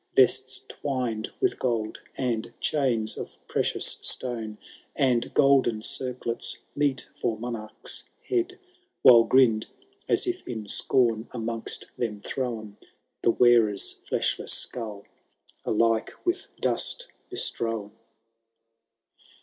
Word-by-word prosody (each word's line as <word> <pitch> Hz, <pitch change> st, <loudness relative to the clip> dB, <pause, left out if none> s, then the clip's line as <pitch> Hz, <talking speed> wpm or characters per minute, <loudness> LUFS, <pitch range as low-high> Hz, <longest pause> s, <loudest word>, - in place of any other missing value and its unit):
Vests -, -, +3 dB
twined 125 Hz, -6 st, -3 dB
with 380 Hz, -1 st, +1 dB
gold, 115 Hz, -4 st, -1 dB, 0.2 s
and 120 Hz, -3 st, -1 dB
chains 120 Hz, -7 st, 0 dB
of -, -, -7 dB
precious -, -, +4 dB
stone, 115 Hz, -4 st, 0 dB, 0.4 s
And 125 Hz, -4 st, +2 dB
golden 135 Hz, -6 st, +4 dB
circlets, 125 Hz, -2 st, -2 dB, 0.2 s
meet 140 Hz, -3 st, 0 dB
for 115 Hz, -2 st, -1 dB
monarchs 110 Hz, -2 st, -3 dB, 0.2 s
head; 370 Hz, -1 st, 0 dB, 0.5 s
While 120 Hz, -2 st, +9 dB
grinn'd, 120 Hz, -5 st, +4 dB, 0.4 s
as -, -, +3 dB
if 360 Hz, 0 st, -2 dB
in 110 Hz, -3 st, -5 dB
scorn 115 Hz, 0 st, +1 dB
amongst 115 Hz, -1 st, -1 dB
them 110 Hz, -4 st, -2 dB
thrown. 115 Hz, -5 st, -4 dB, 0.4 s
The -, -, +3 dB
wearer's 115 Hz, -4 st, +4 dB, 0.2 s
flediless -, -, 0 dB
skull, 105 Hz, -4 st, -3 dB, 0.6 s
alike 115 Hz, 0 st, +2 dB
with 370 Hz, +2 st, -1 dB
dust -, -, +1 dB, 0.2 s
bestrown. 115 Hz, -, -2 dB
120 Hz, 100 wpm, -26 LUFS, 110-130 Hz, 0.6 s, While